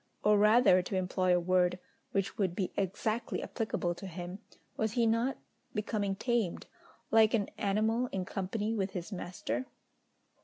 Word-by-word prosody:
or 210 0 +5
rather, 210 -2 +6
to 185 - -4
employ 185 0 +1
a 175 - +5
word, 180 0 +2 0.3
which 195 -1 -1
would 185 -4 0
be 185 -1 -1
exactly 215 +5 -1
applicable 215 -6 -2
to 190 +3 -8
him, 180 +2 -6 0.4
was 220 -1 -1
he 235 -1 +3
not 230 +4 +1 0.4
becoming 205 -2 -1
tamed, 230 -4 -1 0.5
like 220 +1 +6
an 205 -3 0
animal 220 +4 +1
in 190 -5 -3
company 205 +4 -2
with 195 -3 -1
his 180 +2 -5
master? 185 +7 -4
200 Hz, 150 wpm, -32 LUFS, 185-220 Hz, 0.5 s, rather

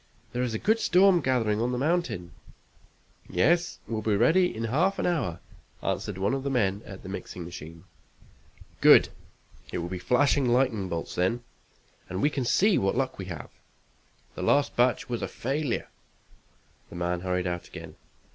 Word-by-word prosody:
"There's 125 -2 -1
a - - +1
good 220 - +2
storm 185 -3 +5
gathering 115 -5 +1
on 120 +1 0
the 125 - -1
mountain!" 130 - -1 1.0
"Yes, 175 +5 +2
we'll 110 -2 -2
be 105 -1 +1
ready 160 - +4
in 115 - -5
half 165 - +1
an - - -1
hour," 140 - -1 0.4
answered 95 +1 -2
one 100 +6 0
of 135 - -1
the 140 - -2
men 105 -6 +1
at 95 -2 -10
the - - -9
mixing 90 -2 -6
machine. 85 -1 -9 1.0
"Good. - - +7 0.6
It - - -3
will 85 0 -3
be 90 0 -4
flashing 135 +4 +2
lightning 120 -6 +1
bolts 85 -1 -4
then, 115 +7 0 0.7
and 95 0 -3
we 145 - +2
can 135 -3 -2
see 200 - +3
what 95 +4 0
luck 130 -4 -1
we 95 - -4
have. 85 -4 -8 0.8
The - - -7
last 140 +10 +2
batch 125 +6 +2
was 120 -2 -3
a - - -2
failure." 135 +1 -2 1.0
The - - -11
man 90 0 -1
hurried 90 0 -1
out 90 -1 -3
again. - - -9
Mr. - - -30
115 Hz, 175 wpm, -27 LUFS, 95-140 Hz, 1.0 s, Good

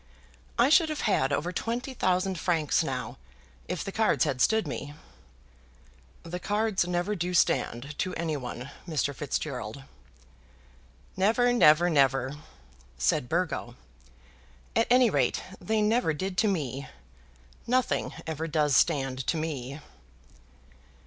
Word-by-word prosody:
I 240 +3 +5
should 320 +1 +5
have 310 - -3
had 145 - +1
over 160 +5 -1
twenty 235 +8 -3
thousand 185 -4 0
francs 160 -5 +1
now, - - -4 0.5
if 180 -4 -3
the 195 - -5
cards 215 - +2
had 125 -2 -1
stood 220 - +3
to - - -5
me." 145 +2 -6 1.3
"The 170 +2 -5
cards 205 -1 0
never 175 +3 -1
do 180 -2 -2
stand 140 -3 +1
to 185 - -1
any 165 -2 -2
one, 125 0 -6 0.2
Mr. 145 -3 -1
Fitzgerald." 135 -3 -4 1.3
"Never; 230 +6 +3
never, 170 -7 +6
never!" 135 -4 +2 0.6
said 95 - +1
Burgo. 165 -8 -2 1.0
"At 230 - +3
any 250 -2 +5
rate, 135 -6 +1 0.2
they 220 -1 0
never 210 -7 +2
did 190 +5 -3
to 220 - +3
me. 140 - -2 0.8
Nothing 250 0 +1
ever 160 0 -3
does 150 -3 +2
stand 135 -5 +1
to 170 - +1
me." 145 -3 -4
165 Hz, 130 wpm, -28 LUFS, 140-210 Hz, 1.3 s, never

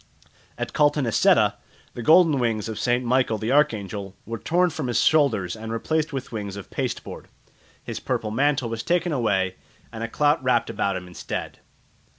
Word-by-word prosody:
At - - -4
Caltanisetta 145 -5 +3 0.4
the 120 - -6
golden 160 +1 +5
wings 115 -4 0
of 110 -1 -5
St. 125 +1 +1
Michael 125 -2 +2
the 110 +3 -2
Archangel 100 -8 0
were 115 +1 -5
torn 175 - +2
from 155 -4 -4
his 120 - +1
shoulders 115 - +2
and 110 0 -7
replaced 155 +7 -1
with 135 -3 -5
wings 100 -3 -5
of 100 - -9
pasteboard; - - -4 0.6
his - - -5
purple 110 - -2
mantle 135 +1 +1
was 115 0 -3
taken 175 +4 0
away 95 -8 0 0.4
and 115 0 -5
a - - -1
clout 145 +4 +1
wrapt 125 -2 +1
about 100 -1 -1
him 90 -1 -5
instead. 90 - -6
120 Hz, 165 wpm, -24 LUFS, 110-145 Hz, 0.6 s, golden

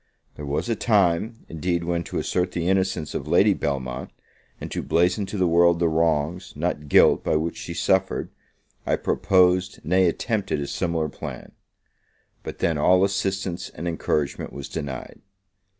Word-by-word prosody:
There 75 - -8
was 70 +10 -2
a 115 - 0
time, 105 +1 +1
indeed, 85 +2 -2
when 85 0 -1
to - - -5
assert 90 0 -1
the 85 -1 -2
innocence 95 -4 0
of - - -4
Lady - - +4
Belmont, 65 -2 -3 0.5
and - - -7
to - - -2
blazon 90 +4 +1
to 105 - -5
the 95 - +2
world 85 0 +4
the 85 0 +2
wrongs, 80 +2 0
not 75 -1 -2
guilt, - - +5
by - - +1
which 80 +2 -1
she 85 - -7
suffered, 95 +2 0 0.5
I - - +1
proposed, 90 +1 +2
nay 90 +3 +3
attempted, 100 - -1
a 70 - -2
similar 80 +1 -1
plan: 70 - -8 0.9
but - - -7
then 80 -3 0
all 90 +5 +4
assistance 95 -2 -1
and 85 - -6
encouragement 75 -3 -2
was 70 -1 -7
denied. 70 -5 -6
85 Hz, 160 wpm, -24 LUFS, 80-95 Hz, 0.9 s, guilt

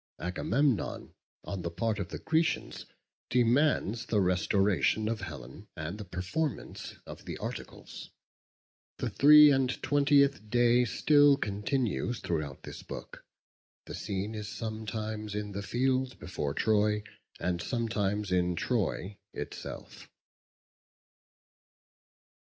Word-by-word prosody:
Agamemnon, 115 +8 0 0.3
on 100 -2 -5
the 85 - -3
part 105 +6 -1
of 95 -2 -4
the - - -5
Grecians, 160 +1 -1 0.4
demands 120 -2 +2
the 105 - +2
restoration 95 +3 +2
of 115 -1 -2
Helen, 80 - -9
and 80 +6 -5
the 105 - -6
performance 95 - -4
of - - -10
the - - -5
articles. - - -7 0.9
The - - -3
three 150 +1 +8
and 135 -2 +2
twentieth 140 -5 +3
day 120 +1 +4
still 145 +4 +5
continues 110 +3 -1
throughout 75 -5 -3
this - - -8
book. - - -9 0.6
The - - -8
scene 100 +2 -3
is 105 -1 -5
sometimes 110 0 -4
in 105 -1 -3
the 100 +1 -4
field 130 +4 0
before 75 -6 -4
Troy, 105 -1 +2 0.4
and 85 0 -1
sometimes 105 -4 -1
in 90 -1 +2
Troy 100 -1 -2 0.2
itself. - - -8
105 Hz, 110 wpm, -30 LUFS, 95-125 Hz, 0.9 s, three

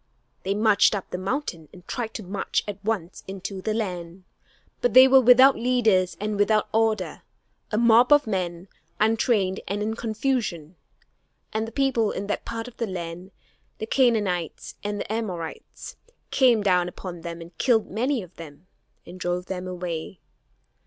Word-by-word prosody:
They 195 +1 -1
marched 215 0 +4
up 195 - -6
the 180 - -3
mountain 190 - -3
and 180 -1 -16
tried 230 -3 -4
to 215 - -5
march 195 +2 -2
at 205 -1 -6
once 200 -5 -3
into 190 0 -6
the 215 +2 -2
land. 180 -4 -4 0.6
But 245 -1 +1
they 260 +1 +10
were 265 0 +7
without 255 +3 +7
leaders 225 -7 +2
and 210 0 -3
without 215 +1 +2
order 220 -3 0 0.5
a 210 - -1
mob 235 +2 +5
of 295 0 +6
men, 180 -3 -3 0.3
untrained 215 -3 +2
and 205 +1 -2
in 220 +1 -2
confusion. 215 - -2 0.8
And 220 +1 -1
the - - -8
people 260 -6 +1
in 200 - -4
that 205 - -3
part 230 0 -5
of 250 - -13
the 230 - -2
land, 175 -1 -6 0.5
the 220 - -4
Canaanites 210 - 0
and 205 0 -3
the 210 - -4
Amorites, 185 -8 -6 0.3
came 240 -5 +4
down 180 -3 +2
upon 175 -1 -8
them 170 0 -6
and 170 0 -12
killed 230 -4 +3
many 245 +3 -1
of 180 0 -16
them 160 0 -11 0.4
and 180 +2 -11
drove 175 0 -2
them 185 -1 -5
away. 175 -1 -5
205 Hz, 165 wpm, -25 LUFS, 180-225 Hz, 0.8 s, they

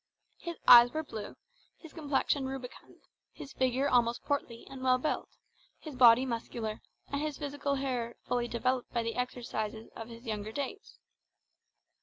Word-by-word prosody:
His 340 -1 -6
eyes 240 0 +10
were 315 0 -2
blue, 220 -7 -7 0.4
his 325 - -14
complexion 285 -3 0
rubicund, 265 -2 -9 0.3
his 275 - -10
figure 260 +2 +1
almost 240 -3 +2
portly 250 -5 -3
and 265 -1 -9
well 255 -1 +4
built, 300 +4 -2 0.5
his 310 -4 -9
body 250 0 +7
muscular, 230 -2 -4 0.3
and 280 +1 -2
his 305 -2 -3
physical 285 -1 -2
powers 250 -4 -2
fully 245 -1 -1
developed 250 +2 -1
by 235 -1 0
the 230 0 -2
exercises 230 -3 -4
of 225 0 -8
his 230 +1 -11
younger 215 -1 -4
days. 285 - -6
250 Hz, 150 wpm, -31 LUFS, 235-280 Hz, 0.5 s, eyes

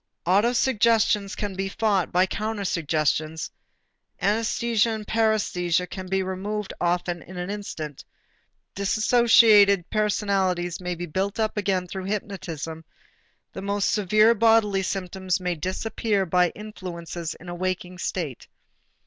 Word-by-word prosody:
Autosuggestions 215 0 +2
can 205 -2 -3
be 195 +1 -3
fought 200 -3 0
by 180 +1 +4
countersuggestions, 160 -7 -1 0.7
anæsthesia 225 +2 +1
and 215 -1 -7
paræsthesia 200 -6 +1
can 185 0 -7
be 190 +1 0
removed 195 +2 -4
often 175 0 0
in 185 +3 -11
an 180 +2 -3
instant, 160 -8 -6 0.7
dissociated 210 -2 +5
personalities 195 -5 0
may 180 0 -3
be 175 +1 -5
built 190 +6 -2
up 220 -1 0
again 195 -3 0
through 185 +1 -6
hypnotism, 170 -6 -5 0.7
the - - -6
most 200 0 0
severe 215 +2 +4
bodily 225 -3 +3
symptoms 185 -1 -2
may 180 -1 -1
disappear 195 +4 -1
by 180 0 +3
influences 175 -5 -7
in 180 - -14
a 175 - -5
waking 185 0 -3
state. 160 -10 -4
195 Hz, 120 wpm, -25 LUFS, 180-210 Hz, 0.7 s, dissociated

